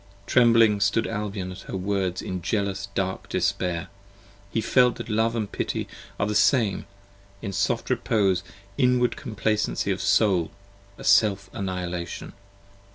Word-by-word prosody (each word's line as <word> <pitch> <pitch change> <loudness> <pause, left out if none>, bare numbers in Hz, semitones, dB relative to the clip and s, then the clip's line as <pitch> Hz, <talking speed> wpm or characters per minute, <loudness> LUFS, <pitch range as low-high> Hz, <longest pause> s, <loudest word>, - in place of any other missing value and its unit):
Trembling 115 -4 +5
stood 100 +3 +2
Albion 105 -4 -4
at 90 - -9
her - - -3
words 95 -1 -1
in 90 -1 -4
jealous 100 +1 -1
dark 95 -1 -2
despair, 90 0 -1 0.6
He - - 0
felt 125 +2 +3
that - - -7
Love 110 +2 +1
and 110 -3 -2
Pity - - -3 0.3
are - - +2
the 105 - -1
same; 110 -2 +2 0.6
a 100 - -3
soft 95 - 0
repose: 95 -5 +1 0.4
15 125 0 +4
Inward 125 -1 +1
complacency 110 -7 -1
of - - -2
Soul: 95 -6 +3 0.5
a - - -10
Self 100 -3 +3
annihilation. 90 -2 -4
100 Hz, 140 wpm, -25 LUFS, 95-115 Hz, 0.6 s, Trembling